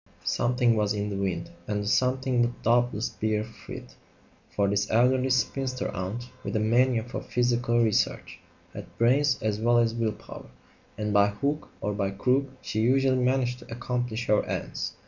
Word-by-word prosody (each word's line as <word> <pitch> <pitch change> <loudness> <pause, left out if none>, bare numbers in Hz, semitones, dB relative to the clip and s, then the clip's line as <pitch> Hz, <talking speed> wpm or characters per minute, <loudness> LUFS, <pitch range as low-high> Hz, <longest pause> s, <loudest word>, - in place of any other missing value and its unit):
Something 120 -1 +2
was 105 -1 +1
in 105 0 -2
the - - -3
wind, 95 -3 -2 0.2
and 105 -1 -1
the - - -5
"something" 130 +2 +2
would 120 0 -1
doubtless 120 -1 +2
bear 110 0 -1
fruit; 110 +1 -10 0.6
for 100 -1 0
this 100 +1 0
elderly 125 +3 +3
spinster 130 0 0
aunt, 100 +7 -4 0.2
with - - -4
a - - +2
mania 115 +2 +2
for 120 - -6
psychical 120 -1 +1
research, 110 -2 0 0.3
had - - -10
brains 130 +3 +3
as 105 -1 0
well 120 +2 +3
as 115 -1 +3
will 115 -2 -1
power, - - -12 0.5
and 105 0 -2
by 100 0 +5
hook 140 +9 -2
or 105 - -1
by 100 -1 -1
crook 125 +8 +1 0.2
she 110 - -3
usually 130 +2 +3
managed 125 -1 +1
to - - -14
accomplish 120 0 -3
her 105 -1 +3
ends. - - -4
120 Hz, 170 wpm, -27 LUFS, 105-125 Hz, 0.6 s, by